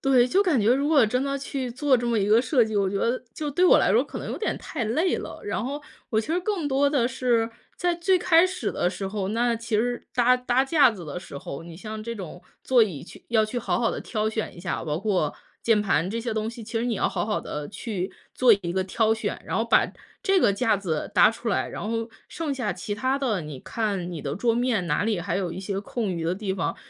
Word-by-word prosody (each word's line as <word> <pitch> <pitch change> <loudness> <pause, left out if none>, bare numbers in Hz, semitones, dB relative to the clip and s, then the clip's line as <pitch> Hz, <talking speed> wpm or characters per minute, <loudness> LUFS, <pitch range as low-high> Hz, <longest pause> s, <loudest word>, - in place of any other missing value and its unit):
对， 260 -3 +4
就 380 +11 +3
感 315 - +2
觉 220 +4 +4
如 280 +2 +1
果 290 -7 +6
真 250 +5 0
的 275 0 -1
去 270 -2 -4
做 260 +1 +2
这 240 0 -2
么 230 -2 +1
一 195 - +1
个 220 +2 +6
设 255 -2 +3
计， 220 -1 -3
我 200 -1 +2
觉 195 - -2
得 240 +5 0
就 300 -1 -3
对 355 +6 +2
我 - - +7
来 - - +3
说 - - +4
可 - - -7
能 - - -5
有 - - -4
点 440 - -1
太 235 - -4
累 315 - +1
了。 - - -7
然 245 - -2
后 285 +3 -4 0.3
我 220 -1 +2
其 225 - -9
实 335 - +1
更 365 -6 -1
多 280 +1 +3
的 265 -4 +2
是， 235 -2 +1 0.3
在 355 -1 +1
最 370 +2 +2
开 350 0 +5
始 370 - -3
的 175 - 0
时 190 +1 -4
候， 195 -2 -3
那 235 +2 +1
其 230 -1 -2
实 245 +3 -1
搭 250 0 +4
搭 250 +1 +1
架 275 -3 +5
子 185 -6 -8
的 150 +4 -5
时 140 - -10
候， 140 +2 -7
你 170 -1 -10
像 215 +4 -6
这 230 +1 -4
种 180 -3 -8 0.2
座 250 -3 +5
椅 175 -10 -2
去 - - -13
要 220 -2 +3
去 245 +3 -3
好 240 - -1
好 230 - +2
地 - - -4
挑 215 -1 -1
选 220 -1 -3
一 - - -9
下， 175 -2 -3
包 150 0 -1
括 190 -7 0 0.3
键 220 -3 +3
盘 185 -3 +1
这 230 +3 -3
些 230 -1 -3
东 220 0 -1
西， 230 0 -8
其 225 +1 -3
实 235 - -1
你 240 -2 0
要 - - +1
好 - - -2
好 215 - 0
地 150 -1 -5
去 200 -4 -4 0.2
做 250 -3 +5
一 170 0 -2
个 190 0 0
挑 220 +3 +2
选， 220 - -3
然 - - -2
后 - - +1
把 - - +4 0.3
这 390 -3 +3
个 205 - +4
架 220 +1 +2
子 175 -6 -3
搭 - - +7
出 230 +1 -5
来。 200 - 0
然 - - -6
后 230 0 -2 0.2
剩 305 -4 -3
下 240 -8 -1
其 195 +3 -4
他 260 +6 0
的， 225 -9 0
你 150 -4 -7
看 195 - -3
你 155 - -6
的 140 +3 -3
桌 230 +2 +2
面 235 -7 +1
哪 150 +4 +1
里 215 -5 0
还 175 +1 -2
有 185 -3 -1
一 175 - -6
些 195 0 -3
空 220 0 -3
余 170 -3 -2
的 165 +2 0
地 190 0 -3
方， 175 - -2
225 Hz, 285 characters per minute, -25 LUFS, 195-255 Hz, 0.3 s, 我